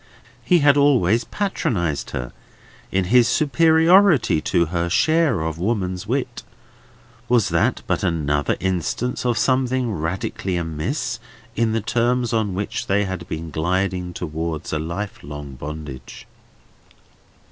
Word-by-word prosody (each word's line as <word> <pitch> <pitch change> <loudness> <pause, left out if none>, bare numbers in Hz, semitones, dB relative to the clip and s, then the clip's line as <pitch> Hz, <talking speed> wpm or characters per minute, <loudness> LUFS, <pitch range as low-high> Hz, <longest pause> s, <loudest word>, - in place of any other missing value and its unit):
He 175 -3 +3
had 145 0 +5
always 120 -6 +3
patronised 85 - -2
her, 60 0 -5 0.6
in 95 0 +1
his 125 -2 +6
superiority 160 - +4
to 85 0 +1
her 85 0 0
share 155 - +2
of 80 0 -3
woman's 95 -2 -2
wit. 130 +3 -2 0.9
Was 120 -4 +3
that - - +1
but - - -1
another 75 -5 0
instance 95 +8 -2
of 120 -1 +1
something 130 -2 +1
radically 90 +2 -3
amiss 85 - -3 0.4
in 115 -1 +1
the 115 - 0
terms 120 +2 0
on 105 -4 0
which 100 +2 -3
they 100 +1 +2
had 95 -2 -5
been 80 -1 -5
gliding 90 +3 -1
towards 80 -2 -4
a 75 - 0
life 85 +6 -5
long 75 -1 -8
bondage? 70 -2 -8
95 Hz, 125 wpm, -21 LUFS, 80-125 Hz, 0.9 s, his